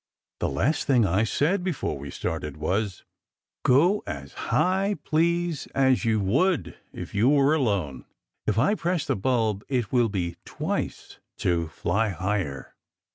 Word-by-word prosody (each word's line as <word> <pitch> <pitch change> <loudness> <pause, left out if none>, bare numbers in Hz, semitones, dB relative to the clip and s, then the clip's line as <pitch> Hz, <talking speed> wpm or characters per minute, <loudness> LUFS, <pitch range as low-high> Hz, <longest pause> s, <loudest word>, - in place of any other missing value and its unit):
The - - 0
last 130 - 0
thing 125 -5 +4
I 95 +4 +2
said 165 - +1
before 180 -6 -2
we 70 0 -7
started 75 +1 -4
was, 95 +5 -1 0.6
"Go 170 +11 +4
as - - -6 0.2
high, 195 +3 +2
please, 170 0 0
as 130 -2 +3
you 110 -1 +2
would 135 - +1 0.2
if - - -8
you 110 +6 +3
were 145 0 +4
alone. 100 - -1 0.4
If 105 - +1
I 165 - +4
press 175 -5 -1
the - - 0
bulb, 110 -2 0
it 125 -6 -1
will 120 -3 +3
be 85 -4 -3
twice, - - -4 0.2
to 85 -2 0
fly 105 +7 0
higher." 95 -7 -3
115 Hz, 145 wpm, -26 LUFS, 95-155 Hz, 0.6 s, thing